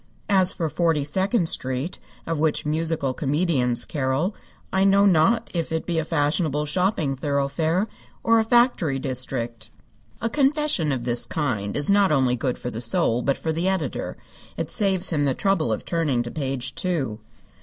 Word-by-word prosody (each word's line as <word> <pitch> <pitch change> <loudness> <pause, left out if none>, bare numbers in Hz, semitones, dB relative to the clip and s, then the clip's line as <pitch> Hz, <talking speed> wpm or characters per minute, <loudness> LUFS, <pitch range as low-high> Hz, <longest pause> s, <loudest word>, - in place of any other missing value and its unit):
As 190 -2 +5
for 165 - -2
Forty 165 -2 +1
second 190 - 0
Street, 130 +3 -2 0.3
of 165 -2 -2
which 155 -1 +1
musical 155 -3 -1
comedians 140 -4 +1
carol, 140 +7 -1 0.4
I 190 0 +3
know 195 +1 +5
not 200 +6 +3
if 165 -3 -2
it 160 0 -2
be 170 -2 -1
a - - 0
fashionable 150 -1 0
shopping 155 -3 0
thoroughfare 145 +7 0 0.4
or 230 0 +4
a - - +3
factory 230 - +2
district. 120 -4 -4 0.5
A 230 - -1
confession 280 - +1
of 130 -3 -2
this 120 0 0
kind 110 -10 -2
is 145 +6 +4
not 200 -2 +4
only 130 -4 +2
good 125 0 -2
for 125 - -5
the 115 - -5
soul, 115 0 +2
but 140 +2 0
for 160 - -2
the 165 +3 -1
editor. 185 -9 -2 0.4
It - - -3
saves 190 -4 +1
him 145 -3 +1
the 135 -2 +1
trouble 195 - +1
of 110 - -3
turning 150 -8 0
to 120 - -7
page 135 -3 -3
two. 145 -12 -2
155 Hz, 170 wpm, -23 LUFS, 135-185 Hz, 0.5 s, As